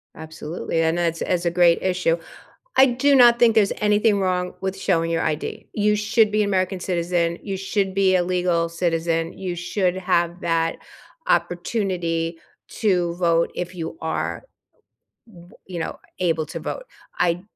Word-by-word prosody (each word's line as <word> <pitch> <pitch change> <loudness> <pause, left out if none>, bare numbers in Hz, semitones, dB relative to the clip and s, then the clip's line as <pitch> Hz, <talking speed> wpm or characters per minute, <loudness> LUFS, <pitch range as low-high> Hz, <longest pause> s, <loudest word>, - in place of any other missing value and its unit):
Absolutely, 160 +1 -4
and 160 +1 +1
that's 165 -1 0
that's 180 -1 -1
a 170 - +2
great 170 -1 +4
issue. 180 -3 +1 0.6
I 265 - +8
do 270 +3 +3
not 240 -2 +7
think 230 -2 +5
there's 205 -2 +3
anything 210 0 +2
wrong 180 -1 -1
with 190 0 -3
showing 165 -4 0
your 165 - 0
ID. 160 +8 -3
You 210 0 +2
should 210 +1 +2
be 210 0 +2
an 200 - -1
American 185 0 0
citizen. 170 -1 -1
You 195 -2 -4
should 195 0 -1
be 190 -1 +3
a 180 - +3
legal 175 -2 0
citizen. 165 -1 -1
You 180 -2 -4
should 180 +1 -1
have 175 -2 0
that 165 -1 0 0.5
opportunity 175 -3 -1 0.3
to 180 -6 0
vote 170 -1 +1
if 180 +1 -4
you 170 - -5
are, - - -3 0.8
w 175 -6 -16 0.2
you 180 -2 -6
know, - - -4 0.2
able 165 -3 0
to - - -7
vote. - - -5 0.3
I 175 0 +1
180 Hz, 160 wpm, -22 LUFS, 170-195 Hz, 0.8 s, I